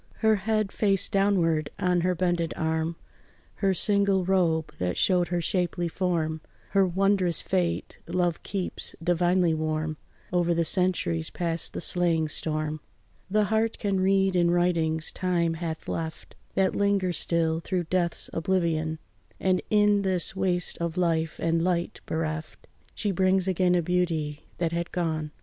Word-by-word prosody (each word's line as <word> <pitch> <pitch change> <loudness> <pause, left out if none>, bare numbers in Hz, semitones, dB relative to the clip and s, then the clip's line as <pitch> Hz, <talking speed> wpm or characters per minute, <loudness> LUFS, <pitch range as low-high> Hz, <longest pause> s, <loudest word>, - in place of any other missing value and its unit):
Her 220 0 +6
head, 215 0 0
face 195 -3 +1
downward, 180 -7 +1
on 180 -1 +1
her 180 +1 +1
bended 175 -1 0
arm, 160 +1 -1 0.6
Her 195 -2 +1
single 200 -2 +2
robe 170 -4 +1
that 90 -1 -1
showed 180 -2 +3
her 175 -1 -1
shapely 175 0 0
form, 165 -3 -1 0.3
Her 195 -1 +4
wondrous 185 -2 +1
fate 180 -3 -2
love 175 -1 0
keeps 190 -2 -5
divinely 175 0 +2
warm 155 0 -2 0.4
Over 175 -1 +2
the 165 0 +1
centuries, 160 - +1
past 170 -1 -3
the - - -4
slaying 165 -3 +1
storm. 155 0 -1 0.5
The 210 +2 +3
heart 220 +1 +1
can 200 -2 0
read 190 0 +2
in 175 -1 +3
writings 165 -2 +1
time 175 -3 0
hath 160 -1 -5
left, 160 -1 -5 0.2
That 190 -1 +2
linger 200 -3 +1
still 165 0 0
through 180 +1 -2
death's 175 0 0
oblivion; 165 -2 0 0.4
And 185 -1 +1
in 210 -1 +4
this 190 -2 0
waste 180 -2 +2
of 170 0 -3
life 165 -3 0
and 165 0 0
light 175 -1 -1
bereft, 155 -1 -4 0.3
She 205 - -1
brings 185 0 +2
again 185 -1 +2
a 175 - +2
beauty 160 -4 -1
that 170 -2 0
had 170 0 -3
gone. 160 -3 -2
175 Hz, 145 wpm, -27 LUFS, 160-190 Hz, 0.6 s, Her